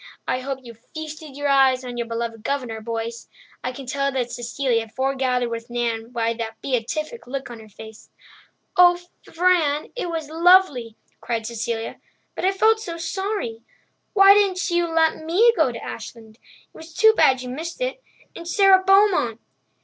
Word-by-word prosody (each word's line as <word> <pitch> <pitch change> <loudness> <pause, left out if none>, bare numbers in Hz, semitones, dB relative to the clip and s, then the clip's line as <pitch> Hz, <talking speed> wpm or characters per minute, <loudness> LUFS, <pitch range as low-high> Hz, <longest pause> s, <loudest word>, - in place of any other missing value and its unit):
"I 255 - 0
hope 265 0 -5
you 235 -1 -10
feasted 305 +4 -9
your 290 0 -1
eyes 265 -2 +3
on 245 -1 -6
your 235 -1 -3
beloved 230 -1 -4
Governor, 245 -5 -3
boys. 230 +1 -5 0.3
I 250 - -2
can 265 +1 -9
tell 275 +2 -1
that 250 -3 -2
Cecilia 240 -1 -1
forgathered 260 0 -1
with 230 +1 -6
Nan 235 -1 -2
by 230 -1 0
the 225 -1 -5
beatific 305 - -3
look 270 -1 -5
on 235 - -9
her 220 -1 -14
face." 220 +1 -13 0.7
"Oh, 355 -1 +6 0.3
Fran, 325 -4 +1
it 475 -8 -3
was 325 -3 -4
lovely!" 325 - +4 0.2
cried 230 -2 -3
Cecilia. 230 0 -4 0.3
"But - - -3
I 380 - +4
felt 440 +3 +3
so 345 -6 -6
sorry—why 385 - 0
didn't 390 -2 +1
you 345 0 +1
let 320 -1 +1
me 405 +9 +4
go - - +2
to - - -8
Ashland? 225 -2 -9 0.4
It - - -31
was 320 0 -12
too 440 0 +6
bad 260 - +3
you 250 - -6
missed 325 - -6
it—and - - -7
Sara 380 +1 +5
Beaumont." 385 - +3
270 Hz, 165 wpm, -22 LUFS, 235-345 Hz, 0.7 s, Oh